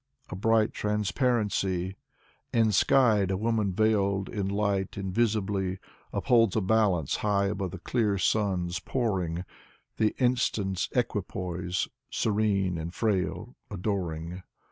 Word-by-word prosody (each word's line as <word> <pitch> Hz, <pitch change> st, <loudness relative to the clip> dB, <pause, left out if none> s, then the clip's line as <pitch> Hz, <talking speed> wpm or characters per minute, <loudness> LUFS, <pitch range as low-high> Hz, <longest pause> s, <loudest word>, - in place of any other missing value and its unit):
A -, -, -3 dB
bright 110 Hz, +2 st, +2 dB
transparency! 105 Hz, -4 st, 0 dB, 0.6 s
Enskied 110 Hz, -1 st, +4 dB
a 95 Hz, -, 0 dB
woman 110 Hz, -1 st, 0 dB
veiled 100 Hz, -1 st, +1 dB
in 100 Hz, -3 st, -2 dB
light 100 Hz, -1 st, -1 dB
invisibly 100 Hz, -1 st, 0 dB, 0.3 s
Upholds 115 Hz, -5 st, +3 dB
a 110 Hz, -, +2 dB
balance 95 Hz, -7 st, +2 dB
high 100 Hz, -1 st, +1 dB
above 100 Hz, -2 st, -2 dB
the 95 Hz, -, -7 dB
clear 105 Hz, +2 st, 0 dB
sun's 90 Hz, -3 st, 0 dB
pouring, 95 Hz, -8 st, -1 dB, 0.5 s
The 110 Hz, -1 st, +1 dB
instant's 115 Hz, -7 st, 0 dB
equipoise, 90 Hz, -6 st, -2 dB, 0.2 s
serene 100 Hz, -5 st, +1 dB
and 80 Hz, +1 st, -4 dB
frail, 105 Hz, +4 st, -1 dB
adoring. 90 Hz, -4 st, -3 dB
100 Hz, 105 wpm, -28 LUFS, 95-110 Hz, 0.6 s, Enskied